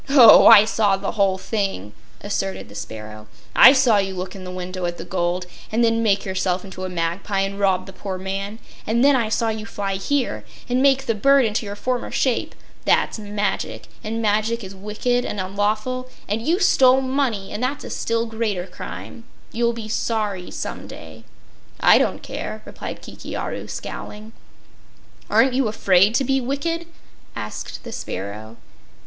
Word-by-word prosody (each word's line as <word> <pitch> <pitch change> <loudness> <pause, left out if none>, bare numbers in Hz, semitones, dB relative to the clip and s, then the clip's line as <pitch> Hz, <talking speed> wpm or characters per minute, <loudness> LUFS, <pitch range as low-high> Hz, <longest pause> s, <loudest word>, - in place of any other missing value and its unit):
"Oh, 255 -6 +9
I 205 - +10
saw 210 -3 +2
the 195 0 -3
whole 195 -3 +2
thing," 190 - -3 0.3
asserted 95 0 -3
the - - -13
sparrow. 105 0 -8 0.3
"I 260 - +10
saw 250 -6 +4
you 195 -1 -2
look 185 +1 -5
in 190 -1 -9
the - - -6
window 185 0 -5
at 175 0 -4
the - - -7
gold, 180 0 -1 0.3
and 230 +2 +2
then 230 0 +2
make 205 -3 +2
yourself 185 -1 -1
into 185 -1 -7
a - - -4
magpie 180 +3 -1
and 195 +1 -3
rob 190 -2 +2
the 190 - -11
poor 190 0 -5
man, 195 +3 -4 0.3
and 235 +4 +3
then 285 -1 +6
I 230 -4 +1
saw 225 +1 +1
you 220 0 -4
fly 195 -3 -3
here 215 - -1 0.2
and 250 +1 +1
make 270 -1 +3
the 230 - +1
bird 275 +4 +4
into 215 0 -1
your 200 - -5
former 250 +3 -2
shape. 255 -4 0 0.3
That's - - +2
magic, 210 0 -3 0.2
and 225 +1 -3
magic 215 +2 +1
is 190 0 -8
wicked 215 +5 -1
and 210 - -4
unlawful; 215 +7 -1 0.2
and 210 +3 -1
you 330 - +1
stole 265 -9 +5
money, 260 -7 -1
and 215 - -4
that's 270 +3 -2
a - - -7
still 230 0 -1
greater 220 -5 -2
crime. 190 +5 -9 0.3
You'll 235 +1 +1
be 230 -2 -7
sorry, 210 -4 -2
some - - -6
day." 110 +8 -11 0.5
"I - - +6
don't - - -1
care," - - -6
replied - - -8
Kiki - - -8
Aru, - - -4
scowling. 215 +1 -7 1.0
"Aren't 265 -1 +4
you 260 -2 +2
afraid 200 0 +3
to 270 - +3
be 270 +1 +1
wicked?" 330 +6 -2 0.5
asked - - -6
the 235 - -8
sparrow. 110 - -6
210 Hz, 175 wpm, -22 LUFS, 190-240 Hz, 1.0 s, I